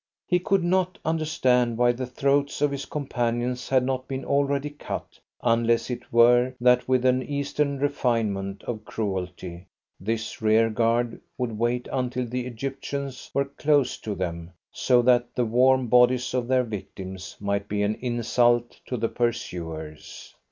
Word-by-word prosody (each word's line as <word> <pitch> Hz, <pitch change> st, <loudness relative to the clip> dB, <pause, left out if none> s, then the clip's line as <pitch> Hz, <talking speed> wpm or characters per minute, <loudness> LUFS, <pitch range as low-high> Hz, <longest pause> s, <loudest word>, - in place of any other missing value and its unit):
He 180 Hz, -, +2 dB
could 195 Hz, 0 st, +1 dB
not 185 Hz, +1 st, +1 dB
understand 130 Hz, -7 st, +1 dB
why 120 Hz, 0 st, +4 dB
the 125 Hz, +1 st, -4 dB
throats 140 Hz, +3 st, +1 dB
of 145 Hz, 0 st, +2 dB
his 140 Hz, 0 st, -4 dB
companions 125 Hz, -4 st, -2 dB
had 130 Hz, -1 st, +3 dB
not 130 Hz, 0 st, -2 dB
been 135 Hz, -1 st, -4 dB
already 140 Hz, +1 st, +1 dB
cut, 145 Hz, -, -7 dB, 0.2 s
unless 115 Hz, +1 st, +2 dB
it 120 Hz, 0 st, -6 dB
were 120 Hz, +2 st, +5 dB
that 125 Hz, 0 st, +4 dB
with 130 Hz, -1 st, +2 dB
an 130 Hz, 0 st, +4 dB
Eastern 140 Hz, +1 st, -1 dB
refinement 115 Hz, -8 st, -1 dB
of 110 Hz, -3 st, -5 dB
cruelty 90 Hz, -4 st, -4 dB, 0.3 s
this 115 Hz, 0 st, -3 dB
rearguard 115 Hz, +2 st, +2 dB, 0.2 s
would 125 Hz, -3 st, -2 dB
wait 120 Hz, +1 st, 0 dB
until 125 Hz, -1 st, -1 dB
the 125 Hz, +1 st, -3 dB
Egyptians 135 Hz, +2 st, -5 dB
were 140 Hz, -, +1 dB
close 140 Hz, -1 st, +1 dB
to 105 Hz, -2 st, -4 dB
them, 85 Hz, -2 st, -4 dB, 0.2 s
so 125 Hz, -1 st, +3 dB
that 120 Hz, -1 st, +3 dB
the 125 Hz, -, +1 dB
warm 130 Hz, +3 st, +4 dB
bodies 125 Hz, +1 st, +4 dB
of 125 Hz, -2 st, -1 dB
their 130 Hz, 0 st, +3 dB
victims 95 Hz, -4 st, -7 dB
might 100 Hz, 0 st, -1 dB
be 105 Hz, 0 st, -1 dB
an 105 Hz, +1 st, +1 dB
insult 120 Hz, 0 st, +1 dB
to 125 Hz, -, -2 dB
the 115 Hz, 0 st, 0 dB
pursuers. 80 Hz, -10 st, -4 dB
125 Hz, 150 wpm, -25 LUFS, 115-135 Hz, 0.3 s, were